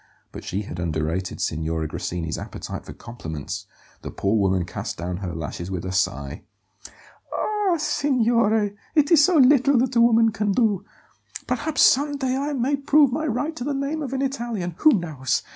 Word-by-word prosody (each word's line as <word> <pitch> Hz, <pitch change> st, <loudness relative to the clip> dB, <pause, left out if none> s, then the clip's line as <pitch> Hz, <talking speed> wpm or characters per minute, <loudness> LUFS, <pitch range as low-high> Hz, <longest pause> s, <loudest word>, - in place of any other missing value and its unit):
But -, -, -9 dB
she 100 Hz, +3 st, -3 dB
had 90 Hz, -, -7 dB
underrated 85 Hz, +2 st, -2 dB
Signora 80 Hz, 0 st, -2 dB
Grassini's 80 Hz, +1 st, -4 dB
appetite -, -, -7 dB
for -, -, -7 dB
compliments; 80 Hz, -, -7 dB, 0.3 s
the -, -, -6 dB
poor 100 Hz, +3 st, -1 dB
woman 95 Hz, -4 st, +1 dB
cast 85 Hz, -, -6 dB
down 90 Hz, +1 st, -4 dB
her 90 Hz, -2 st, -5 dB
lashes 80 Hz, +3 st, -5 dB
with 90 Hz, -2 st, -4 dB
a 95 Hz, -, -3 dB
sigh. 70 Hz, -5 st, -1 dB, 0.9 s
"Ah, 415 Hz, -4 st, 0 dB
signore, 230 Hz, -8 st, +2 dB, 0.2 s
it 300 Hz, 0 st, +3 dB
is 310 Hz, -3 st, +7 dB
so 350 Hz, +1 st, +4 dB
little 275 Hz, 0 st, +5 dB
that 255 Hz, +1 st, +1 dB
a 235 Hz, -, +5 dB
woman 230 Hz, -1 st, +5 dB
can 210 Hz, -2 st, -1 dB
do! 205 Hz, -4 st, +1 dB, 0.6 s
Perhaps 315 Hz, -1 st, +1 dB
some 285 Hz, +1 st, +4 dB
day 260 Hz, -2 st, -1 dB
I 285 Hz, +2 st, -2 dB
may 275 Hz, +2 st, 0 dB
prove 280 Hz, 0 st, +4 dB
my 310 Hz, +3 st, -1 dB
right 285 Hz, +6 st, -2 dB
to 245 Hz, -, -5 dB
the 285 Hz, +1 st, -2 dB
name 280 Hz, +3 st, -2 dB
of 270 Hz, -4 st, -4 dB
an 270 Hz, 0 st, -1 dB
Italian 235 Hz, -9 st, -3 dB
who 310 Hz, -, +6 dB
knows? 155 Hz, -, -1 dB
225 Hz, 175 wpm, -23 LUFS, -, 0.9 s, is